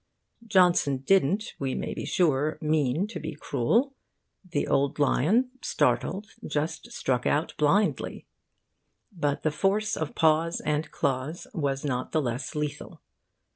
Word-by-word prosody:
Johnson 175 -9 +3
didn't, 195 +4 +2
we 135 -2 -2
may - - -3
be - - -5
sure, 155 -4 +1
mean 155 +1 +1
to 215 - -6
be 155 0 -5
cruel. 230 - +1 0.5
The 175 -6 -2
old 140 0 +1
lion, 185 - +2
startled, 205 +2 0 0.2
just 155 +2 -3
struck 125 -2 -1
out 150 +2 +1
blindly. 195 +8 +1 0.9
But 145 -7 -2
the 155 - +2
force 200 +7 +1
of 160 -2 -4
paw 160 +1 +3 0.2
and 150 0 0
claws 140 +4 -2
was 140 -3 -1
not 130 -3 -2
the 155 - +3
less 125 +3 -3
lethal. 150 -1 -4
155 Hz, 135 wpm, -27 LUFS, 140-180 Hz, 0.9 s, Johnson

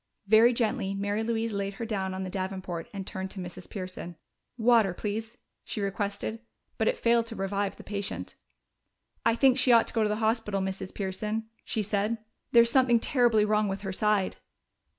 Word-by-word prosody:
Very 220 +4 +6
gently 225 -4 0
Mary 205 +2 -1
Louise 225 -1 -1
laid 200 0 -2
her 230 - -4
down 190 -4 -2
on 190 - -3
the 185 - -4
davenport 185 -3 -4
and 195 -2 -6
turned 190 -1 -4
to 190 - -7
Mrs. 175 -1 -7
Pearson. 185 -3 -6 0.4
"Water, 225 -5 +4
please," 220 +4 -4 0.3
she - - -4
requested. 200 +2 -2 0.4
But - - +2
it - - +2
failed 235 0 +3
to 225 - -4
revive 195 0 -2
the - - -11
patient. 200 -1 -4 0.9
"I 230 - +3
think 265 +1 +4
she 255 0 +5
ought 230 -1 +6
to - - -5
go 225 - +1
to 215 - +2
the 210 - +1
hospital, 220 -2 0
Mrs. 190 0 -3
Pearson," 215 +3 -3
she 215 - -1
said. 210 +3 0 0.3
"There's 235 0 +6
something 250 -3 +4
terribly 235 -4 +3
wrong 210 0 +2
with 195 0 -3
her 195 -2 -4
side." 210 -1 +1
210 Hz, 185 wpm, -28 LUFS, 195-230 Hz, 0.9 s, Very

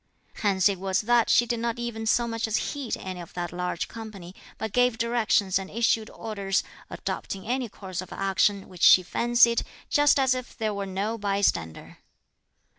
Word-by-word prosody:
Hence 195 -3 +3
it 195 -3 -1
was 190 0 0
that 235 +1 +3
she 240 - +5
did 235 0 -2
not 235 0 -2
even 235 -2 -4
so 235 +1 +2
much 230 -1 -2
as 220 0 0 0.2
heed 280 -5 -4
any 185 -1 -6
of 170 - -12
that 175 -1 -3
large 180 -1 -3
company, 210 -6 -9 0.2
but 220 -1 -5
gave 245 -2 +3
directions 225 -5 +1
and 190 0 -7
issued 225 0 +1
orders, 200 -4 -2 0.3
adopting 195 -1 -5
any 250 0 -1
course 190 -3 -6
of 185 - -11
action 195 0 +1
which 180 -2 -13
she 185 - +8
fancied, 235 +4 +3 0.3
just 290 -1 +4
as 265 -1 +3
if 255 -1 -6
there 220 -2 -1
were 200 -1 -4
no 205 +4 -3
bystander. 200 - -1
215 Hz, 180 wpm, -26 LUFS, 190-235 Hz, 0.3 s, she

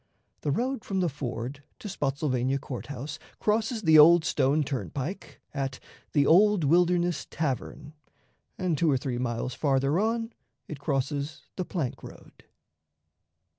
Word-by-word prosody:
The - - -2
road 245 - -1
from 195 -1 -2
the 180 -2 +2
ford 130 -1 -5 0.2
to - - -8
Spottsylvania 135 -6 0
Court 130 -2 -7
House 145 +3 -6 0.2
crosses 220 +1 0
the 160 -2 +7
Old 165 +2 +8
Stone 145 +2 +2
Turnpike 135 - -5
at 135 -3 -3 0.3
the 145 -2 +4
"Old 200 +2 +5
Wilderness 175 +2 +2
Tavern," 150 0 -3 0.6
and, 180 -3 0
two 165 - +3
or 135 - +3
three 125 -1 -3
miles 120 0 -2
farther 140 +3 +1
on, 225 +2 -1 0.3
it 150 - -7
crosses 140 +1 -2
the 185 - -3
plank 160 -10 -3
road. - - -14
150 Hz, 135 wpm, -28 LUFS, 135-180 Hz, 0.6 s, Old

